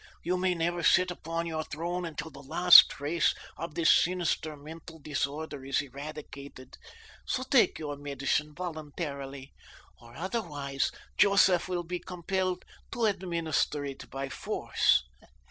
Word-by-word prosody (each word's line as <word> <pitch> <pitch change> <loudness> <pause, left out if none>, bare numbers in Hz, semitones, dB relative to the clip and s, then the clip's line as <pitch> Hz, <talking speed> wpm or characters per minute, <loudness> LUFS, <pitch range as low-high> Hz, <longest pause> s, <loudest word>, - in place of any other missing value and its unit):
You 180 +2 0
may 185 0 +1
never 175 +1 -1
sit 180 +2 +4
upon 165 -1 -4
your 160 -1 -3
throne 175 +4 -4
until 160 0 -6
the 140 - -12
last 175 +6 +8
trace 155 +4 0 0.2
of 165 -2 -6
this 170 - +4
sinister 165 -3 +1
mental 160 +3 -11
disorder 145 -1 -4
is 135 0 0
eradicated, 140 -1 -8 0.5
so 255 - -2
take 260 -2 +3
your 145 -2 -5
medicine 145 +1 -2
voluntarily, 145 -5 -6 0.5
or 120 0 -15
otherwise 150 - -2 0.3
Joseph 195 -3 +5
will 175 -1 -1
be 175 +1 -4
compelled 185 +1 -3 0.3
to 235 -1 0
administer 170 -7 -1
it 135 -1 -8
by 135 0 -4
force. - - +1
160 Hz, 130 wpm, -29 LUFS, 145-180 Hz, 0.5 s, last